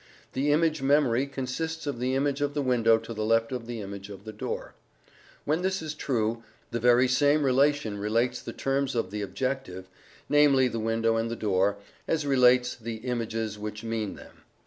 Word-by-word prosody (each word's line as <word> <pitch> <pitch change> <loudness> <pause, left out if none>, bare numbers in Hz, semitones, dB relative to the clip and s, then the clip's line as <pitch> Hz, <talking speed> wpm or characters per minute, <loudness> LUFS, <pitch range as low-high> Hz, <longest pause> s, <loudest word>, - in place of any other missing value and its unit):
The 140 +3 +1
image 155 0 +2
memory 135 -2 +3
consists 140 +5 -4
of 140 -4 -3
the 130 +1 0
image 140 +1 0
of 145 0 -1
the 145 - 0
window 115 -3 +4
to 115 +1 -7
the 110 -1 -3
left 115 +1 +2
of 125 -3 -4
the 120 -2 -5
image 100 0 -7
of 100 -1 -10
the 110 - -7
door. 105 - -5 0.7
When 155 +4 +1
this 190 +1 0
is 155 -1 -5
true, 115 -6 -1 0.3
the 120 - -1
very 120 +2 +5
same 145 +4 +3
relation 135 -5 +2
relates 115 +4 0
the - - -6
terms 135 -1 -1
of 105 -5 -1
the 105 0 -3
objective 100 -4 -3 0.4
(namely 145 -3 +5
the 115 -2 -3
window 115 0 +1
and 115 0 -1
the 115 - -3
door) 100 -2 +1 0.3
as 160 -2 0
relates 125 -2 +4
the 115 -1 -6
images 115 -2 -3
which 105 +1 -6
mean 115 -2 -3
them. - - -14
125 Hz, 190 wpm, -27 LUFS, 110-140 Hz, 0.7 s, very